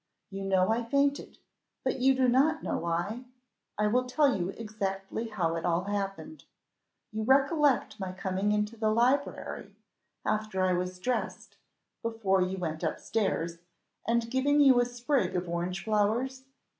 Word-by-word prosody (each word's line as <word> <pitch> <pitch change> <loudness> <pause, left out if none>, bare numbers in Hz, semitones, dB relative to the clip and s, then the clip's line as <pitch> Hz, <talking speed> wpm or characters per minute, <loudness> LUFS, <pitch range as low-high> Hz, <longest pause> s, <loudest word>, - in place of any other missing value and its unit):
You 195 0 -5
know 190 +1 +3
I 235 +2 +1
fainted, 280 +4 0 0.5
but - - -1
you 265 +1 +4
do 260 -1 +3
not 285 +6 +3
know - - -1
why? 175 +9 -2 0.5
I 210 - +2
will 250 +4 +2
tell 275 +1 +3
you 180 -1 -2
exactly 205 0 -4
how 175 -7 -1
it 165 - -3
all 175 +1 +1
happened: 205 +9 -4 0.7
you 215 +1 -3
recollect 270 -2 +3
my 190 -2 -3
coming 190 +2 -1
into 210 +2 0
the 220 -1 0
library 250 +6 0 0.5
after 215 -3 0
I 185 -1 +3
was 180 +1 -2
dressed, 245 +7 -3 0.4
before 225 -5 +1
you 185 +1 -1
went 160 -3 -4
up - - -1
stairs, 170 -6 -1 0.5
and 230 0 +1
giving 285 +3 +2
you 270 -4 +7
a 245 - +3
sprig 245 -4 -1
of 180 0 -1
orange 175 +2 -3
flowers?" 230 +5 0
215 Hz, 155 wpm, -29 LUFS, 190-255 Hz, 0.7 s, you